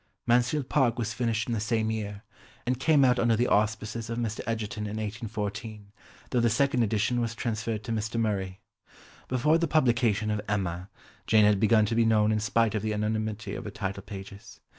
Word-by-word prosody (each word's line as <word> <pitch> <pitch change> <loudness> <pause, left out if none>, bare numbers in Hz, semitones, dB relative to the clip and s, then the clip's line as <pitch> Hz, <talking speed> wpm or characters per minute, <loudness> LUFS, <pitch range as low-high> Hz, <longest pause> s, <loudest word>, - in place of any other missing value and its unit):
Mansfield 125 +3 +2
Park 125 -6 +2
was 115 -2 -2
finished 115 -2 -1
in 120 - -1
the 115 - -1
same 110 0 0
year, 105 -1 -5 0.4
and 125 0 -1
came 145 -1 +4
out 125 -1 +3
under 115 -1 +3
the 120 +3 +2
auspices 110 +1 0
of 115 - -3
Mr. 115 -2 -2
Egerton 110 -2 -3
in 105 +1 -4
1814, 105 -1 -5 0.4
though 125 - +2
the 120 0 +3
second 130 +3 +2
edition 115 +2 +1
was 115 0 -2
transferred 115 -2 -3
to 115 - -5
Mr. 110 +1 -2
Murray. 95 -4 -2 0.7
Before 150 +6 +2
the 170 - +1
publication 120 -8 +2
of 105 -1 -1
Emma, 95 -3 -2 0.4
Jane 110 -1 +5
had 105 -1 +4
begun 110 0 +4
to 110 - -2
be 115 0 +3
known 110 -1 +3
in 110 - +1
spite 110 +1 +1
of 105 - -1
the 110 0 -1
anonymity 105 -1 -2
of - - -6
her - - -4
title 100 -1 -4
pages. 100 0 -10
110 Hz, 195 wpm, -28 LUFS, 105-120 Hz, 0.7 s, Jane